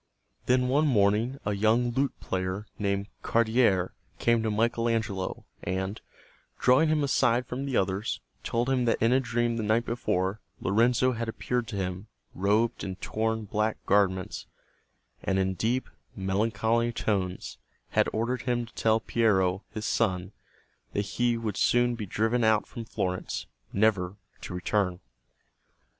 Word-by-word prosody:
Then 125 0 +3
one 145 +4 +3
morning 110 +2 +2
a 105 - 0
young 110 +4 +2
lute 135 +3 -1
player 95 +2 -3
named 100 -1 0 0.2
Cardiere 110 -5 +2 0.3
came 115 -1 +2
to 110 - 0
Michael 115 +2 +1
Angelo 110 -5 -2 0.2
and, 95 +2 -3 0.6
drawing 130 +6 +4
him 155 -1 +2
aside 125 -3 +2
from 130 +3 -4
the 130 - 0
others, 95 +2 0 0.2
told 120 +1 -1
him 130 -2 +2
that 115 - +2
in 115 +2 +3
a 130 - +5
dream 120 -2 0
the - - -1
night 110 +3 +2
before, 95 -3 -1 0.2
Lorenzo 120 +5 +3
had 115 -1 -3
appeared 120 +1 -2
to 110 - -5
him, 95 +1 -3 0.3
robed 105 +4 +1
in 95 -1 -4
torn 110 +2 -2
black 105 +2 0
garments, 95 -2 +1 0.7
and 95 - 0
in 95 0 +1
deep, 115 +7 0 0.3
melancholy 110 +4 +1
tones 95 -5 -2 0.3
had - - +2
ordered 120 +3 -1
him 120 -2 0
to 115 - -18
tell 110 0 +2
Piero, 100 -5 +2
his 110 0 -5
son, 95 -4 0 0.6
that 100 - +1
he 120 +3 0
would 110 -4 -3
soon 120 0 +3
be 110 -3 -5
driven 110 +5 +1
out 110 -1 +3
from 115 - -8
Florence, 90 -3 -3 0.3
never 100 -3 +2 0.3
to - - -7
return. 90 -1 0
110 Hz, 150 wpm, -28 LUFS, 100-120 Hz, 0.7 s, a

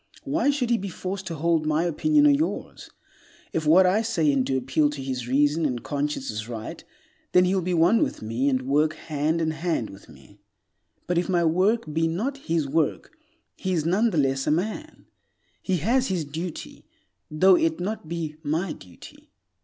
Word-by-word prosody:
Why 285 +1 +1
should 265 -4 0
he 235 - +3
be 195 +1 -5
forced 185 +1 -5
to 165 - -4
hold 160 0 +1
my 155 +2 +2
opinion 295 - +2
or 295 - +7
yours? 295 +3 -2 0.6
If 160 -2 -1
what 180 +5 +6
I 190 +4 +3
say 175 -10 +1
and 135 -2 +1
do 130 +1 0
appeal 130 +4 +1
to 145 -2 -6
his 130 -2 -4
reason 145 +5 +2
and 125 -6 -1
conscience 145 -2 -2
as 110 +2 -6
right, 115 -2 -7 0.5
then 180 0 +6
he 180 - +1
will 190 - +1
be 180 0 -1
one 175 +8 +4
with - - -1
me 115 +6 0
and 130 -1 0
will 130 - -7
work 155 +2 +3
hand 155 +1 -1
and 160 -1 0
hand 160 -7 -2
with 95 0 -15
me. 100 - -18 0.7
But 175 -1 +1
if 175 - -3
my 175 -2 +2
work 190 +8 +2
be 165 +1 +1
not 225 +13 -2
his 165 - -1
work, 160 - -1 0.4
he 190 -1 -3
is 160 -3 0
nonetheless 165 - +1
a - - +3
man. 215 - -3 0.6
He 190 -2 0
has 245 - +1
his 180 -5 -1
duty, 160 +4 -7 0.4
though 185 +5 +5
it 165 -1 +1
not 185 -3 -4
be 160 -3 -4
my 160 +3 -1
duty. 90 -2 -15
165 Hz, 190 wpm, -25 LUFS, 145-190 Hz, 0.7 s, or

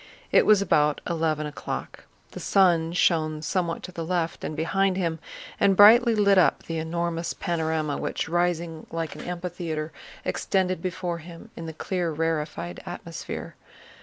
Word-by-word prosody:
It - - +5
was 210 -2 +6
about 150 -5 +2
eleven 160 -3 0
o'clock. 150 - -6 0.3
The - - -8
sun 170 -4 +3
shone 155 -3 +1
somewhat 170 0 -1
to 185 - -7
the 170 -2 -5
left 170 -1 -2
and 155 - -4
behind 185 +4 +1
him 165 -3 -1 0.4
and 195 -1 +4
brightly 230 +3 +8
lit 200 -2 +5
up - - +3
the 165 -1 -3
enormous 170 +1 -2
panorama 160 -3 -1
which, - - -2
rising 170 -1 -1
like 165 -1 -3
an - - -9
amphitheater, 170 -3 -4 0.3
extended 185 -3 0
before 180 -1 -3
him 170 +7 -12
in 165 - -7
the - - -4
clear 175 +1 -2
rarefied 155 - -2
atmosphere. - - -7
170 Hz, 150 wpm, -26 LUFS, 160-185 Hz, 0.4 s, brightly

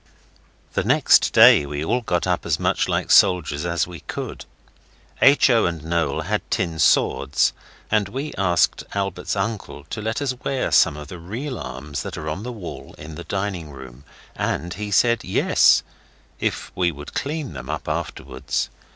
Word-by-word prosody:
The - - 0
next - - +4
day - - +7
we 75 +2 -4
all 125 +9 0
got 90 -7 -1
up - - 0
as - - -1
much - - 0
like - - -1
soldiers 85 -5 +4
as 85 0 0
we 85 -2 -10
could. - - -7 0.8
H. 140 +1 +6
O. 115 -5 +4
and 85 -3 -4
Noel 80 -3 -1
had - - -1
tin 85 -3 -1
swords, 70 - +3 0.4
and 105 -3 +2
we 135 +7 -5
asked 90 -4 +1
Albert's 95 -2 -2
uncle 100 -7 -4
to 110 - -4
let 110 +1 -2
us 140 -3 -1
wear 135 -2 -1
some 75 - +4
of 75 0 -9
the 90 - -8
real 120 - -5
arms 70 +3 -6
that - - -6
are 75 0 -4
on 80 +6 -4
the 125 +3 -5
wall 105 -8 -9
in 80 +1 -9
the 85 +3 -8
dining 95 -5 -3
room. 65 -2 -12 0.3
And 85 +4 -2
he 105 +2 -5
said, 115 +4 +3
'Yes', - - +4 0.6
if - - -2
we 90 -1 +1
would 75 0 -10
clean 145 - -3
them 65 -3 -8
up - - -4
afterwards. 65 -1 -3
90 Hz, 175 wpm, -22 LUFS, 75-110 Hz, 0.8 s, day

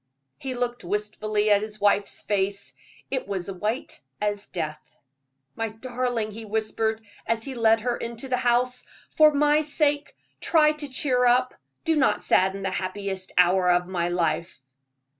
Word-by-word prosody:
He 265 -2 -4
looked 245 -1 -3
wistfully 210 +2 -1
at 205 0 +5
his 215 0 -7
wife's 205 0 +1
face 200 0 -1 0.4
it 260 -5 -2
was 195 -1 -3
white 210 +6 -4 0.2
as 205 -1 -2
death. 155 -3 -6 0.6
"My 225 0 -2
darling," 240 -1 -3
he 225 +2 -8
whispered, 220 +1 -1 0.2
as 230 -1 0
he 270 - -4
led 225 -2 +3
her 240 +1 -1
into 235 +3 -5
the 255 -1 0
house, 250 0 +1 0.3
"for 310 -1 +6
my 295 +1 +3
sake 295 -1 0 0.2
try 310 -2 +4
to 300 -1 -6
cheer 255 -1 +1
up. 255 +1 +3 0.3
Do 325 -1 +3
not 285 -3 +2
sadden 190 +1 +2
the 190 - -1
happiest 190 0 -3
hour 180 0 +4
of 180 0 +3
my 175 -1 -1
life." 175 0 -1
220 Hz, 155 wpm, -25 LUFS, 195-250 Hz, 0.6 s, for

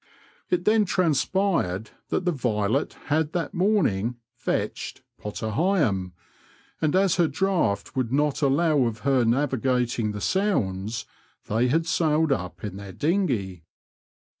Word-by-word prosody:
It 180 0 0
then 215 0 +4
transpired 165 - +1 0.2
that 185 - -1
the 180 - +3
Violet 120 -3 0 0.2
had 155 0 +1
that 170 -4 -2
morning 150 - +1
*' 125 - -68
fetched 120 - -3
" - - -48
Potter 105 +1 -4
Heigham, 115 - +1 0.7
and 155 0 +1
as 190 -1 +3
her 170 -2 +4
draught 155 - 0
would 125 -3 -1
not 145 +2 +1
allow 145 0 +3
of 115 0 -5
her 135 -3 +3
navigating 125 -2 +1
the 105 - -5
Sounds, 110 - 0 0.4
they 115 +4 +1
had 160 +6 +1
sailed 160 -1 +2
up 90 -9 -3
in 100 -2 -5
their 100 -1 -8
dinghey. 125 - 0
135 Hz, 140 wpm, -25 LUFS, 110-170 Hz, 0.7 s, then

